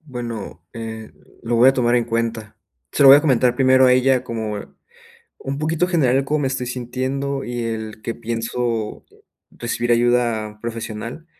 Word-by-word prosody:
Bueno, 120 - -7
eh, 110 -1 -7 0.3
lo 115 0 -1
voy 125 +3 +7
a - - -2
tomar 120 -2 +1
en 120 - +1
cuenta, 115 -2 -3 0.4
se - - +2
lo 135 - +9
voy 140 - +11
a - - +4
comentar 125 -4 +3
primero 130 0 +5
a 125 - +5
ella, 130 0 +3
como, 110 -2 -4
eh, - - -9 0.7
un 140 +1 -5
poquito 160 +3 0
general 140 -8 +2
el 135 - +1
cómo 150 +2 0
me 135 - 0
estoy 130 -1 -2
sintiendo, 130 +3 -3
y 120 -1 -4
el 110 -1 -5
que 115 - -3
pienso 115 -1 -3 0.5
recibir 120 0 -3
ayuda 115 -3 +1
profesional, 115 +5 -6
120 Hz, 175 wpm, -21 LUFS, 115-130 Hz, 0.7 s, voy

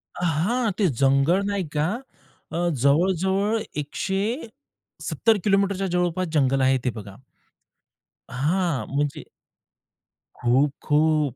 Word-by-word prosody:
अ, 180 - -5
हां. 205 +9 +1
ते 205 - +2 0.2
जंगल 140 +9 +3
नाही 195 -5 -2
का 150 - +2 0.6
अ, - - -3 0.2
जवळ-जवळ 190 - +2 0.2
170 220 - -3
किलोमीटरच्या 195 -1 +2
जवळपास 180 +1 0
जंगल 135 -2 +2
आहे 135 - +3
ते 125 - +1
बघा. 100 -3 -9 1.2
हां. 160 +3 0
म्हणजे 145 0 -1 1.1
खूप, 130 +4 +2
खूप. 150 -3 +2
170 Hz, 100 wpm, -24 LUFS, 140-195 Hz, 1.2 s, जंगल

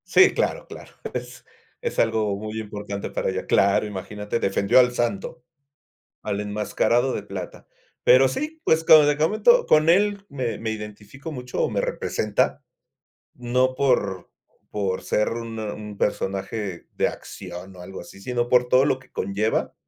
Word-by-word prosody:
Sí, 385 - +6
claro, - - -1
claro. - - -11 0.9
Es 475 -1 -3
algo 110 -3 +1
muy 110 +1 -5
importante, 105 -2 -5
para - - -2
ella. - - -3
Claro, 100 +2 +3
imagínate, 105 +2 -4
defendió 100 +4 +3
al 125 -1 +5
Santo, 120 +7 -2 0.8
al 100 - -2
enmascarado 105 +5 0
de - - -3
plata. 100 -3 -8 0.4
Pero 130 +2 +6
sí, 305 - -4
pues, 160 0 +3
como 155 -2 +8
le 145 0 +2
comento, 215 - +4
con 155 +1 +4
él, 200 +3 +3
me 130 -7 -3
me 110 - -3
identifico 105 +7 -8
mucho, 125 -3 -4
o - - +1
me - - 0
representa. - - -1 0.7
No 125 +1 0
por 105 -9 0 0.4
por 100 -3 -2
ser 105 - +1
un 115 -1 -5
un 105 -1 -6
personaje 95 -1 -2
de - - +2
acción, 90 0 -9
o 90 - -11
algo 95 +2 -8
así, 90 - -13
sino, 120 +2 -2
por 125 0 +4
todo 130 +2 +5
lo 135 -2 +1
que 130 - -22
conlleva, 100 +3 -1
110 Hz, 155 wpm, -24 LUFS, 100-130 Hz, 0.9 s, como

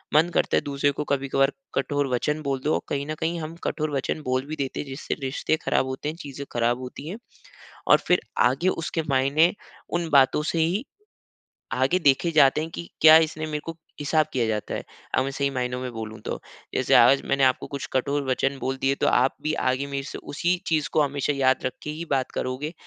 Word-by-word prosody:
मन 160 +3 +5
करता - - +2
है - - +2
दूसरे 140 0 0
को 145 - -3
कभी-कभार 135 0 +2 0.2
कठोर 145 -1 0
वचन 150 +5 0
बोल 135 -2 -1
दो 155 - +1
और - - 0
कहीं 140 0 -1
न 155 - -3
कहीं 170 +1 -1
हम 160 +2 -6
कठोर 155 -1 -2
वचन 135 +3 -2
बोल 130 +1 0
भी 155 - -4
देते 135 -2 -3
हैं 145 - -4
जिससे 135 +2 -4
रिश्ते 135 +3 0
खराब - - +2
होते 130 +3 -4
हैं, 155 - -5
चीज़ें 140 -4 -8
खराब 120 +1 +1
होती 130 +3 -8
हैं। 195 - -5 0.7
और - - +7
फिर 180 - +4 0.3
आगे 135 +8 0
उसके 165 -1 -2
मायने 140 +5 +3 0.4
उन 170 -1 -1
बातों 140 +1 +4
से 165 - 0
ही 175 +9 +1 0.9
आगे 130 +8 +2
देखे 145 +1 +3
जाते 150 -2 +5
हैं 160 - -4
कि 170 - -7
क्या 155 0 +10
इसने 155 0 -6
मेरे 150 -1 -3
को 165 - -3 0.3
हिसाब 155 +2 +2
किया 125 -3 +1
जाता 105 -1 -2
है। - - -3 0.3
अब 130 - +3
मैं 135 - -3
सही 140 0 0
मायनो 125 -1 -2
में 125 -1 -4
बोलूँ 110 -1 -6
तो, - - -3 0.3
जैसे - - +1
आज 130 +4 +7
मैंने 135 0 +2
आपको 130 -1 +2
कुछ 140 -1 -5
कठोर 140 +2 0
वचन 135 +2 0
बोल 135 +1 -2
दिए 135 +1 +2
तो - - +3
आप 130 +2 +3
भी 155 - -1 0.2
आगे 130 +2 -1
मेरे 140 -1 -3
से - - -6
उसी 175 +5 -1
चीज़ 155 -3 +1
को 155 - +4
हमेशा 145 0 0
याद 130 -2 +2
रख 130 - -1
के - - -5
ही 155 +3 -5
बात 135 -2 0
करोगे 130 +5 -3
140 Hz, 220 wpm, -25 LUFS, 130-155 Hz, 0.9 s, क्या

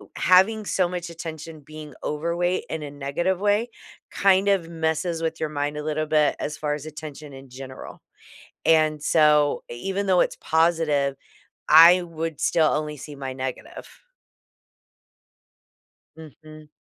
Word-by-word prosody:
Having 205 +4 +3
so 185 -2 +1
much 175 -1 -5
attention 160 -1 -8
being 155 0 -11
overweight 170 +4 -1
in 160 -2 -4
a 145 - -7
negative 145 +6 -2
way 210 +3 +1 0.4
kind 195 0 +3
of 185 -5 +1
messes 165 +1 -2
with 160 0 -2
your 155 - -2
mind 145 0 -3
a 150 - -5
little 155 0 -2
bit, 150 -1 +2
as 150 +1 -4
far 150 -1 -2
as 150 0 -9
attention 150 -2 -9
in 135 -1 -12
general. 130 +1 -10 0.7
And 155 -2 +3
so, 150 -2 +3
even 195 +12 -3
though 185 -2 +3
it's - - 0
positive, 160 -4 +1 0.5
I 170 +3 +8
would 165 -3 -5
still 160 -2 +2
only 150 0 -2
see 150 +1 -10
my 135 -1 -5
negative. 130 -1 -7 2.3
Mhm. 155 0 -14
155 Hz, 140 wpm, -24 LUFS, 150-170 Hz, 2.3 s, I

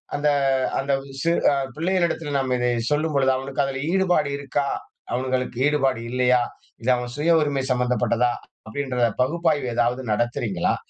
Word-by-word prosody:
அந்த 145 +1 +1 0.5
அந்த 135 +1 0 0.3
சிறு 170 +1 +2
அ - - +2 0.2
பிள்ளைகளிடத்தில 170 -3 0
நாம் 130 -1 0
இதை 125 0 +1 0.2
சொல்லும் 155 +1 +1
பொழுது, 135 -1 +3
அவனுக்கு 135 +1 -2
அதுல 135 0 -3
ஈடுபாடு 180 -7 +2
இருக்கா? 140 0 -1 0.4
அவனுங்களுக்கு 130 0 -1
ஈடுபாடு 135 -5 +1
இல்லையா? 125 0 +3 0.4
இது 130 - +3
அவன் 125 0 -5
சுய 165 +2 +4
உரிமை 140 -3 0
சம்மந்தப்பட்டதா? 125 -1 +1 0.3
அப்படின்ற 125 -1 0
பகுப்பாய்வு 155 -2 0
எதாவது 120 +2 +1
நடத்துறீங்களா? 110 -5 0
135 Hz, 140 wpm, -23 LUFS, 125-150 Hz, 0.5 s, சுய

